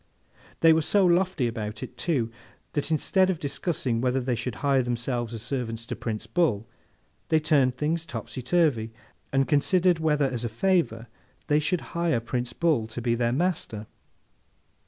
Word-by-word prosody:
They 165 -1 +7
were 160 - +3
so 195 +5 +3
lofty 175 -6 +2
about 110 -2 -5
it, - - -8
too, 130 -10 -1 0.4
that 145 0 -1
instead 185 +4 +2
of 185 - 0
discussing 140 -5 -2
whether 130 +1 +1
they 125 0 -1
should 120 -1 -3
hire 135 -2 +4
themselves 120 -1 -2
as 115 -2 -6
servants 115 -4 -3
to - - -4
Prince 110 -2 -4
Bull, 115 -3 +1 0.6
they 160 - +4
turned 140 -5 +2
things 160 +3 0
topsy 130 - -6
turvy, 125 -6 +1 0.4
and 135 0 +2
considered 175 +4 +3
whether 150 -3 +2
as 125 -3 -2
a 120 - -1
favour 120 - +1 0.4
they 150 0 +3
should 165 +3 0
hire 170 -6 +1
Prince 120 +1 -3
Bull 155 -10 +1
to 110 +2 -6
be 120 0 0
their 120 0 +1
master! 135 - -1
135 Hz, 165 wpm, -26 LUFS, 115-160 Hz, 0.6 s, They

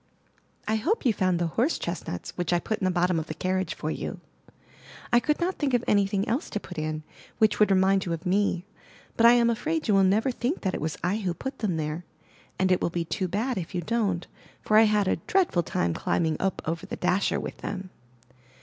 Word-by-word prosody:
I 220 +1 +2
hope 335 - 0
you 240 - +4
found 185 -3 +1
the 170 - 0 0.2
horse 290 +7 +2
chestnuts 170 - -5
which 175 -1 -2
I 175 - +4
put 215 +5 -2
in 190 - -1
the - - +3
bottom 180 -1 +2
of 160 - -5
the 155 - -5
carriage 185 -1 -1
for 155 - -3
you. - - -5 0.9
I 240 - +7
could 300 +4 0
not 360 +2 -1
think 275 -4 +1
of 240 - +1
anything 200 +1 +2
else 250 +7 -1
to 210 - -2
put 180 -5 -8
in, 155 0 -3 0.3
which 220 -2 +3
would 210 - +5
remind 190 0 +3
you 170 - 0
of 165 +3 -6
me; 185 -1 +1 0.5
but 230 - +6
I 235 - +8
am 240 -1 +4
afraid 315 +7 -2
you 210 - +3
will 195 -1 +5
never 215 +7 +3
think 250 +7 -2
that 190 -2 -1
it - - -3
was 155 0 -2
I 180 +4 +1
who 185 -5 -2
put 265 - -6
them 190 -7 -1
there, 155 +2 -3 0.5
and 190 0 +2
it 185 - +3
will - - +1
be 170 -1 -2
too 185 +3 -2
bad 220 +6 -1
if 180 +2 -7
you 175 - 0
don't, 195 -3 0 0.4
for 215 - +1
I 220 +1 +8
had 210 -2 +2
a - - +2
dreadful 340 - +1
time 85 - -1
climbing 160 - 0
up 190 0 -1
over 165 +1 -3
the - - -4
dasher 185 +2 +1
with - - -6
them. 190 -2 -6
190 Hz, 230 wpm, -27 LUFS, 175-225 Hz, 0.9 s, I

